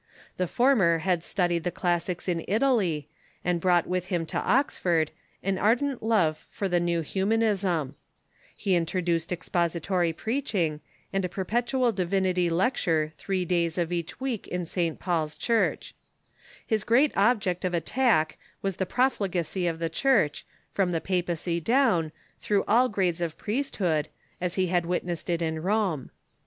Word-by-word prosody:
The 180 - 0
former 215 -8 +3
had 180 -3 +1
studied 175 -4 0
the 175 - 0
classics 175 0 -1
in 170 -3 0
Italy, 200 - +1 0.4
and 175 -1 +1
brought 175 -2 +3
with 180 0 -2
him 175 -3 -1
to - - +1
Oxford 180 - +1 0.3
an 195 0 0
ar 215 +3 +5
dent 275 0 -3
love 190 -9 +1
for 200 - -3
the 175 -1 +2
new 170 -1 0
Humanism, 190 -5 0 0.7
lie 195 - +2
introduced 170 -1 0
expository 175 0 0
preaching, 185 - -1 0.3
and 195 0 +1
a 180 - -1
perpetual 240 +7 0
divinity 185 -2 +1
lecture 165 -4 +1
three 185 +2 -2
days 170 -1 0
of 170 -1 0
each 170 -1 -4
week 260 -5 -3
in 180 -1 -3
St. 165 -1 -2
Paul's 160 -4 -1
Church, 230 -2 0 0.7
His 220 -3 0
great 260 +7 +3
object 200 -4 +2
of 180 -1 0
attack 170 -4 +1 0.2
was 195 -2 -1
the 190 - -1
profligacy 190 - 0
of 165 -1 -1
the 165 0 -1
Church, 165 - +1 0.2
from 195 -3 +1
the 170 -2 0
papacy 175 -1 -1
down, 220 - +2 0.3
through 205 -2 +1
all 245 +4 +4
grades 185 -4 0
of 165 -2 -2
priesthood, 200 - -1 0.3
as 180 -1 -1
he 185 - +2
had 175 -1 0
witnessed 175 -1 -2
it 170 -1 0
in 160 -1 -2
Rome. 190 - 0
180 Hz, 150 wpm, -27 LUFS, 170-205 Hz, 0.7 s, ar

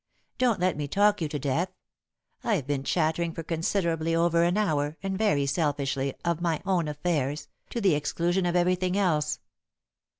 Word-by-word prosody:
Don't 245 -5 +2
let 180 -3 +1
me 145 -1 -2
talk 205 +4 +3
you 160 - 0
to 150 - -3
death 145 +6 0 0.7
I've 200 - 0
been 140 -1 -1
chattering 165 +2 0
for 165 - -5
considerably 165 0 0
over 170 0 +3
an 175 +3 +2
hour, 150 -7 0
and, 195 0 -2
very 190 -9 +2
selfishly, 140 -2 -1
of 170 -1 0
my 165 -3 0
own 180 -5 +1
affairs, 150 -1 -2 0.2
to 235 - -3
the 195 -6 +3
exclusion 170 +5 0
of 175 - 0
everything 180 +1 +2
else." 155 -6 +1
170 Hz, 165 wpm, -27 LUFS, 150-185 Hz, 0.7 s, talk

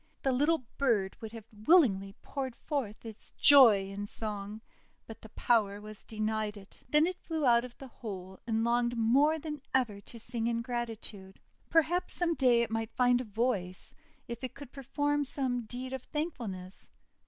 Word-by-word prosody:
The 270 - +2
little 290 +2 +2
bird 220 -8 +2
would 225 0 -7
willingly 215 - +4
have 195 +4 -16
poured 265 -3 -4
forth 240 -9 -4
its 220 -2 -8
joy 230 -9 +7
in 200 +1 -5
song, 210 0 -5 0.4
but 225 - -11
the 220 - -12
power 205 -3 +1
was 215 0 -4
denied 215 -1 -2
it. 195 -1 -15
Then 300 +1 +5
it 365 +1 -3
flew 320 -3 -2
out 235 -1 +5
of 250 -1 -10
the 270 - -9
hole, 190 -6 -8
and 225 -1 +1
longed 240 0 +1
more 275 +8 +4
than 300 -2 -6
ever 225 -6 +1
to 230 - -11
sing 235 0 -2
in 235 0 -1
gratitude. 225 -5 -5 0.3
Perhaps 330 +2 +2
some 345 -1 +1
day 245 -5 +4
it 230 - -4
might 225 0 -3
find 245 0 +4
a - - -6
voice, 205 -4 -2 0.3
if 235 +1 -7
it 255 - -5
could 280 -3 -10
perform 290 +2 -1
some 255 -3 -2
deed 255 +3 -6
of 265 - -4
thankfulness! 230 - -5
235 Hz, 175 wpm, -31 LUFS, 215-270 Hz, 0.4 s, joy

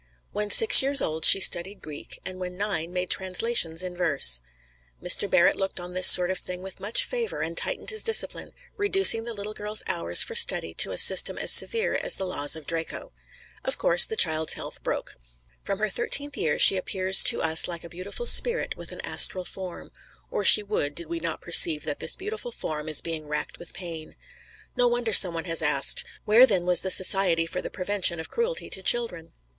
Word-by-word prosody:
When 210 0 -5
six 450 - +6
years 275 +1 +2
old 160 -5 -1
she - - +9
studied 190 +2 +2
Greek, 150 -2 -11
and 185 0 -8
when 180 0 -8
nine 185 -5 -5
made 180 0 -5
translations 185 -3 0
in 180 -1 -8
verse. 140 - 0 0.6
Mr. - - +1
Barrett - - +1
looked 195 -1 -5
on 175 0 -10
this 185 0 +5
sort 180 0 +7
of 185 - -5
thing 180 0 -9
with 190 -1 -12
much 215 +4 -1
favor, 480 -2 -6
and - - -6
tightened - - -4
his 435 -1 -1
discipline, 450 - -1 0.3
reducing 390 - 0
the 235 - -8
little 205 +1 -8
girl's 210 0 -4
hours - - +1
for 465 - -10
study 470 0 +2
to - - +1
a - - -8
system - - +5
as - - +2
severe 460 +1 +1
as - - +1
the 190 - -6
laws 145 -6 -3
of 160 -2 -13
Draco. 165 +1 -7 0.5
Of - - -4
course, - - +2
the 445 - -7
child's 160 - +1
health - - -10
broke. - - -7 0.4
From 195 - -6
her 215 +2 -3
thirteenth 285 +8 -3
year 150 - -3
she 195 - +7
appears 190 0 0
to - - +5
us 160 0 +2
like 170 -2 -8
a - - -11
beautiful 185 - -9
spirit 480 0 +2
with - - -11
an - - -10
astral 185 -1 +1
form; 185 -2 -11 0.4
or - - -4
she 210 - +6
would, 145 -8 -5
did 170 -2 -5
we 170 0 -6
not 165 0 -7
perceive 165 -3 +2
that 145 -2 -7
this - - 0
beautiful 435 +5 -9
form 155 - -8
is 155 - -1
being 160 -2 -7
racked 150 0 -6
with 175 - -11
pain. 170 -4 -10 0.6
No 245 - 0
wonder 240 -2 -3
some 180 -4 +5
one 165 - -7
has 165 -1 -2
asked, 150 -3 -1 0.2
"Where 230 +5 +4
then 190 -6 -2
was 180 -1 +1
the 190 - -5
Society 185 -3 +2
for 180 +2 -7
the - - -8
Prevention 185 -3 -2
of 160 - -10
Cruelty 475 +1 -4
to 190 - -6
Children?" 185 -6 0
185 Hz, 205 wpm, -23 LUFS, 165-225 Hz, 0.6 s, she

